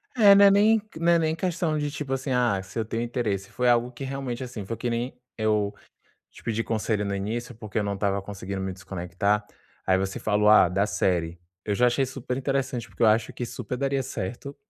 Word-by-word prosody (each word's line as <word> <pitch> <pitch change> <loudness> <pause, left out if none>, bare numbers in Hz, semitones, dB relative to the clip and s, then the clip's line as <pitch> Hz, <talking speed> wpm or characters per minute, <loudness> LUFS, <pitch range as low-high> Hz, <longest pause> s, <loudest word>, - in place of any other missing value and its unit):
É, 205 -5 +8
não 200 - +7
é 200 - +8
nem 215 +2 +5 0.2
não 170 +1 +3
é 170 - +4
nem 160 -1 +1
questão 170 -2 -1
de 145 0 -1
tipo 145 -1 -5
assim: 135 +1 -2
ah, 120 -6 +2
se 95 +3 -10
eu 115 - +1
tenho 115 +1 -3
interesse. 110 -5 -2
Foi 125 0 +1
algo 120 +1 +3
que 125 +3 -8
realmente, 135 -2 -4
assim 120 -5 -7
foi 115 - -4
que 120 - -3
nem 120 +2 -3 0.2
eu 105 -2 +1 0.6
te - - -16
pedi 115 0 -1
conselho 110 -2 -1
no 100 0 -2
início, 115 +5 -4
porque 110 -1 -4
eu - - 0
não 100 0 -1
estava 100 0 0
conseguindo 100 -1 -6
me 95 0 -3
desconectar. 95 +2 -1 0.4
Aí 95 0 +3
você 95 0 -2
falou: 105 0 +2
"Ah, 105 -4 +7
da 95 +3 +1
série". 90 -5 0 0.2
Eu 105 - -1
já 125 +3 +4
achei 135 +3 +2
super 130 -1 -5
interessante 135 -4 -2
porque 100 +4 -2
eu - - +7
acho 110 +1 +3
que 120 - -4
super 125 +2 -5
daria 135 0 0
certo. 130 +3 -5
115 Hz, 225 wpm, -26 LUFS, 100-135 Hz, 0.6 s, É